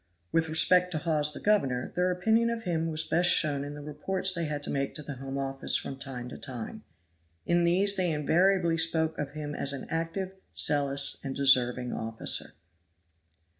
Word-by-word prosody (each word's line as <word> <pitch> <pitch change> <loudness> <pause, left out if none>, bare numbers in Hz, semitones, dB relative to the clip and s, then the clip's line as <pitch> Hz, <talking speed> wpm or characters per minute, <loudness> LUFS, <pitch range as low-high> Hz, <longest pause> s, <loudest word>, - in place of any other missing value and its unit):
With 165 -1 +1
respect 180 +3 +4
to - - -1
Hawes 150 -2 +1
the - - -7
governor, 135 -13 +1
their 180 +1 +2
opinion 220 +6 +2
of 230 -1 -3
him 165 -2 -1
was 160 0 0
best 175 +2 +2
shown 145 -3 +3
in 145 +1 -7
the 150 - -9
reports 185 +6 0
they 170 -2 -2
had 150 -1 -4
to - - -4
make 140 -1 -2
to 150 - -5
the 140 -2 -7
Home 135 +1 -6
Office 135 0 0
from 135 - -2
time 130 -3 -6
to - - -9
time. 125 -5 -7 0.6
In 175 0 +2
these 195 +4 +3
they 185 -2 +1
invariably 170 +3 +2
spoke 160 -1 +2
of 145 -1 -4
him 150 -1 -5
as 140 -1 -1
an 135 - -6
active, 165 +4 -3 0.2
zealous 140 -1 +2
and 135 -1 -4
deserving 125 -3 +3
officer. 115 0 -3
155 Hz, 185 wpm, -28 LUFS, 140-175 Hz, 0.6 s, respect